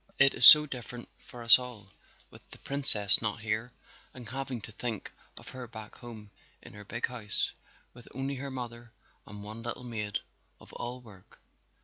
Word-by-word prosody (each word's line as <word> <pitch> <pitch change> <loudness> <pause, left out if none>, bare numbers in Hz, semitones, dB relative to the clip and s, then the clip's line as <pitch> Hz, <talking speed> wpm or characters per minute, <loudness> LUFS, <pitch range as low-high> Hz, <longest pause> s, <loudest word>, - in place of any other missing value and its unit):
It 135 0 +2
is - - +8
so 150 0 +9
different 120 -3 -11
for 120 -1 -15
us 115 +2 +6
all, 115 -6 -13 0.4
with - - -20
the - - -10
Princess 110 -8 +5
not 110 0 -3
here 110 +2 -6 0.4
and 125 -2 -13
having 135 -1 -8
to 110 - -13
think 110 0 -8 0.3
of - - -14
her 130 -1 -12
back 110 -2 -14
home 110 -4 -14 0.3
in - - -16
their 105 0 -14
big 120 +4 -6
house 115 -4 -2 0.4
with 120 -1 -19
only 135 +1 -7
her 140 +1 -9
mother 120 -3 -11 0.3
and 105 -1 -13
one 110 +2 -10
little 120 +2 -9
maid 105 -4 -7 0.4
of - - -20
all 125 +1 -9
work. 100 -5 -21
120 Hz, 175 wpm, -26 LUFS, 110-125 Hz, 0.4 s, so